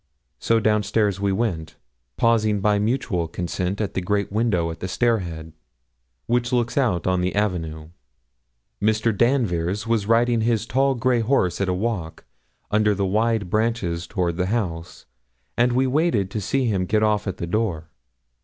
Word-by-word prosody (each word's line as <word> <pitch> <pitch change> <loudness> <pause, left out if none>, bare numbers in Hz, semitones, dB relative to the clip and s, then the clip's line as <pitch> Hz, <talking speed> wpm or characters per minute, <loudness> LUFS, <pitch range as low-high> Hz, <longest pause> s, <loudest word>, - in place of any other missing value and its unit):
So 115 0 +2
down 105 -1 +2
stairs 105 -3 0
we 100 0 0
went, 95 -7 -2 0.4
pausing 110 -3 +2
by 105 +1 +2
mutual 105 -6 -1
consent 90 +3 -3
at 105 -3 -2
the 95 - -1
great 100 +2 -1
window 100 -6 0
at 80 - -9
the 90 - -4
stair 115 +3 +1
head, 80 -3 -7 0.7
which 120 0 0
looks 120 -1 0
out 110 -11 +1
on 90 -1 +1
the 90 +1 -1
avenue. 80 -6 -2 0.9
Mr. 110 +1 +1
Danvers 105 -6 +1
was 115 -3 0
riding 115 0 +3
his 115 -1 +1
tall, 135 +3 +1
grey 125 0 +1
horse 110 -7 +1
at 95 - 0
a - - +1
walk, 95 -5 -3 0.5
under 105 0 +3
the 100 0 0
wide 110 +1 +1
branches 105 -6 -1
toward 90 -4 -1
the 90 0 0
house, 90 -7 -3 0.5
and 120 0 +2
we 130 +2 +2
waited 130 - +1
to 105 - -3
see 135 +6 0
him 95 -5 0
get 110 +2 +2
off 105 -1 +1
at 95 - -3
the - - -4
door. 85 -4 -2
105 Hz, 170 wpm, -23 LUFS, 90-115 Hz, 0.9 s, riding